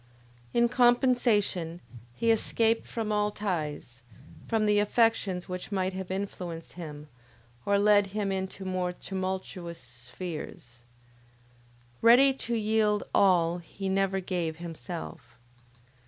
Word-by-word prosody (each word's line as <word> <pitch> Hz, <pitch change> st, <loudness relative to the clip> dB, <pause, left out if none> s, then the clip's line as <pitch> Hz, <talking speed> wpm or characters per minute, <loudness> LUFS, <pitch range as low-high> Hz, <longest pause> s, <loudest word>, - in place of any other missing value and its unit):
In 235 Hz, 0 st, +3 dB
compensation, 240 Hz, -8 st, +2 dB, 0.4 s
he 230 Hz, -, +2 dB
escaped 225 Hz, 0 st, +1 dB
from 220 Hz, -2 st, -3 dB
all 210 Hz, 0 st, +2 dB
ties; 155 Hz, -, -4 dB, 0.5 s
from 220 Hz, -2 st, +1 dB
the 210 Hz, 0 st, +4 dB
affections 205 Hz, -4 st, +1 dB
which 180 Hz, +3 st, -6 dB
might 190 Hz, -1 st, 0 dB
have 190 Hz, -1 st, -5 dB
influenced 180 Hz, -4 st, -5 dB
him, 150 Hz, -4 st, -8 dB, 0.6 s
or 200 Hz, 0 st, +4 dB
led 205 Hz, 0 st, +4 dB
him 200 Hz, 0 st, -2 dB
into 190 Hz, 0 st, -4 dB
more 185 Hz, -1 st, -1 dB
tumultuous 185 Hz, -2 st, -5 dB
spheres. 125 Hz, 0 st, -8 dB, 1.2 s
Ready 255 Hz, +4 st, +7 dB
to 235 Hz, -3 st, -3 dB
yield 215 Hz, -1 st, +2 dB
all, 175 Hz, -3 st, +4 dB
he 190 Hz, +3 st, -6 dB
never 195 Hz, 0 st, +1 dB
gave 175 Hz, -4 st, -2 dB
himself. 170 Hz, 0 st, -8 dB
190 Hz, 110 wpm, -28 LUFS, 175-215 Hz, 1.2 s, Ready